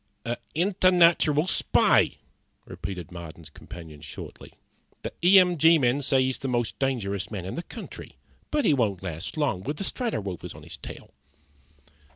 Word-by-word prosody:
"A 120 +1 -2 0.2
internatural 175 -3 +4
spy," - - +3 0.5
repeated 90 -4 -7
Marden's 85 -2 -10
companion, 80 -4 -11
shortly. - - -10 0.5
"The - - -5
E 185 +3 +8
M 180 -3 +5
G 165 +2 +7
men 130 0 +2
say 135 -1 +2
he's 130 0 -1
the 135 - -4
most 120 -2 -1
dangerous 105 -8 -1
man 95 -5 -5
in 95 - -5
the 170 - -3
country. - - -10 0.3
But 295 -4 0
he 155 - +5
won't 105 -9 0
last 90 - -5
long 145 -12 0
with 145 +9 -4
the - - -3
Strato 235 +3 -2
Rovers 95 -4 -6
on - - -12
his - - -8
trail." - - -10
130 Hz, 165 wpm, -26 LUFS, -, 0.5 s, E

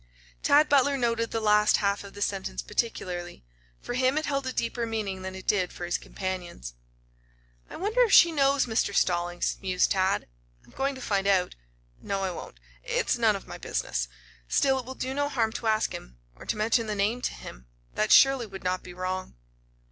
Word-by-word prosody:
Tad 300 +2 +5
Butler 280 -1 +3
noted 230 -2 0
the 225 - -2
last 210 -1 +4
half 200 0 0
of 200 0 -12
the 205 - -1
sentence 195 -2 -3
particularly. 180 - -3 0.3
For - - -6
him 255 +3 +2
it 310 - 0
held 275 -2 -1
a - - -1
deeper 235 -1 -2
meaning 205 -4 -3
than 190 0 -6
it 190 - -9
did 185 -4 +1
for 175 - -6
his 175 - -1
companions. 180 - -6 1.0
"I - - -9
wonder 425 +7 0
if 470 -4 +4
she 340 -3 +8
knows 280 -2 +3
Mr. 220 -3 0
Stallings," 175 -1 0
mused 185 -2 +1
Tad. 190 0 +1 0.4
"I'm - - -20
going 275 - -1
to 260 - -9
find 200 -4 0
out. 190 -2 +2 0.5
No, 195 -1 -2
I 190 - -1
won't. 110 - -9 0.2
It's - - 0
none - - +4
of - - -7
my - - -9
business. - - -2 0.4
Still, 270 - +2
it 250 - -7
will 260 - -6
do 260 +1 -3
no 285 +1 0
harm 230 -6 0
to 230 - -4
ask 215 0 +1
him, - - -9 0.2
or - - -13
to - - -1
mention 225 +1 +1
the 210 - -2
name 210 +5 0
to - - -2
him. - - -11 0.3
That 105 - 0
surely 270 -4 +6
would 195 -1 -9
not 185 0 -1
be 180 -1 -11
wrong." 185 - -4
210 Hz, 200 wpm, -27 LUFS, 185-255 Hz, 1.0 s, she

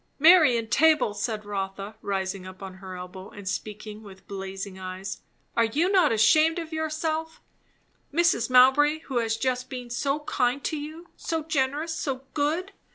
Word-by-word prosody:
"Mary 315 -5 +7
Entable!" 245 +2 +3
said 210 0 -3
Rotha, 195 +1 -4
rising 190 -1 -3
up 185 +1 -11
on 190 -1 -7
her 190 -1 -8
elbow 180 +1 -9
and 205 -2 -11
speaking 210 +2 -5
with 195 -3 -14
blazing 195 0 -6
eyes; 185 +1 -6 0.3
"are 230 - +4
you 310 +12 +1
not 365 -6 +4
ashamed 310 +10 +4
of 330 -1 -5
yourself? 315 +1 -2 0.7
Mrs. 305 -7 +2
Mowbray, 280 +5 +5
who 265 -6 -2
has 225 -1 0
just 255 0 -1
been 250 -2 -7
so 275 +4 -1
kind 260 -1 0
to - - -1
you! 315 +4 -8
so 325 -1 -3
generous! 300 +1 -1
so 270 -4 -3
good! 320 +6 0
250 Hz, 160 wpm, -26 LUFS, 200-310 Hz, 0.7 s, Mary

